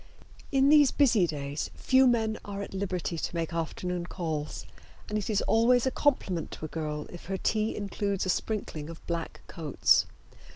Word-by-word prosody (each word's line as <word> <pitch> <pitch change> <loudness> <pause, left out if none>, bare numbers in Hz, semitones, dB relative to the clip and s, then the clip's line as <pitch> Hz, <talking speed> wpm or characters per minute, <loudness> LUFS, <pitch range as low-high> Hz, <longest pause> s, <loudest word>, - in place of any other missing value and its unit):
In 270 0 +4
these 295 -2 +7
busy 235 -11 +4
days 145 -1 -4
few 260 0 +4
men 220 -3 +1
are 200 0 -5
at - - -9
liberty 185 -3 -2
to - - -3
make 165 0 -2
afternoon 175 +1 -3
calls, 155 -5 -4 0.4
and 210 - -4
it 210 0 -1
is 210 -2 +1
always 235 +2 +4
a 260 - +1
compliment 195 - 0
to - - -6
a - - -6
girl 150 -2 -4
if 175 - -10
her 190 +1 -2
tea 215 +3 0
includes 200 -1 -2
a - - -2
sprinkling 175 -6 -2
of 165 - -11
black 170 -1 -4
coats. 155 -4 +2
190 Hz, 175 wpm, -29 LUFS, 165-220 Hz, 0.4 s, these